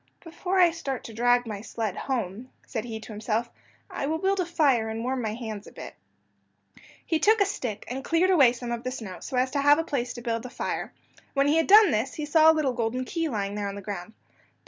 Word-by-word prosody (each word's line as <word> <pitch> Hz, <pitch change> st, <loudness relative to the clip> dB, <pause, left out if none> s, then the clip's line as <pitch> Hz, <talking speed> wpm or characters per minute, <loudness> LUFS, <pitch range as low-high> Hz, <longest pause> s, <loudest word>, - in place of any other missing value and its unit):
"Before 355 Hz, +3 st, -3 dB
I 350 Hz, -2 st, +6 dB
start 275 Hz, -6 st, -4 dB
to 225 Hz, -, -9 dB
drag 245 Hz, +2 st, +3 dB
my 210 Hz, -3 st, -5 dB
sled 220 Hz, -3 st, -4 dB
home," 240 Hz, -2 st, -3 dB, 0.2 s
said 225 Hz, -3 st, -4 dB
he 225 Hz, -2 st, -5 dB
to 220 Hz, -, -10 dB
himself, 220 Hz, +2 st, -2 dB, 0.4 s
"I 275 Hz, -, -4 dB
will 320 Hz, +2 st, 0 dB
build 390 Hz, +3 st, 0 dB
a 360 Hz, -, 0 dB
fire 275 Hz, -10 st, +2 dB
and 225 Hz, +1 st, -4 dB
warm 255 Hz, +1 st, -1 dB
my 215 Hz, -2 st, -2 dB
hands 220 Hz, -4 st, -6 dB
a -, -, -12 dB
bit." -, -, -9 dB, 1.1 s
He 325 Hz, -3 st, 0 dB
took 435 Hz, +5 st, +4 dB
a 400 Hz, -, +5 dB
stick, 240 Hz, -, -4 dB
and 265 Hz, +2 st, -5 dB
cleared 340 Hz, +5 st, +2 dB
away 275 Hz, -9 st, +6 dB
some 240 Hz, -1 st, -6 dB
of 235 Hz, -1 st, -3 dB
the 255 Hz, -, -3 dB
snow, 215 Hz, -8 st, -7 dB
so 255 Hz, -, -5 dB
as 255 Hz, +1 st, +1 dB
to 280 Hz, -, 0 dB
have 290 Hz, +1 st, +6 dB
a 325 Hz, -, 0 dB
place 250 Hz, -6 st, -2 dB
to 240 Hz, -, -8 dB
build 230 Hz, -1 st, -1 dB
the 250 Hz, -, -8 dB
fire. -, -, -4 dB, 0.4 s
When 275 Hz, +1 st, +3 dB
he 300 Hz, +3 st, +3 dB
had 325 Hz, -, +2 dB
done 420 Hz, 0 st, +8 dB
this 220 Hz, +5 st, -1 dB
he 305 Hz, -, -4 dB
saw 315 Hz, +1 st, +6 dB
a 320 Hz, -, +5 dB
little 290 Hz, -5 st, +1 dB
golden 245 Hz, +2 st, -2 dB
key 330 Hz, +3 st, -2 dB
lying 200 Hz, -5 st, -2 dB
there 205 Hz, -1 st, -3 dB
on 200 Hz, -, -5 dB
the 200 Hz, -, -7 dB
ground. 200 Hz, 0 st, -6 dB
250 Hz, 245 wpm, -26 LUFS, 225-315 Hz, 1.1 s, done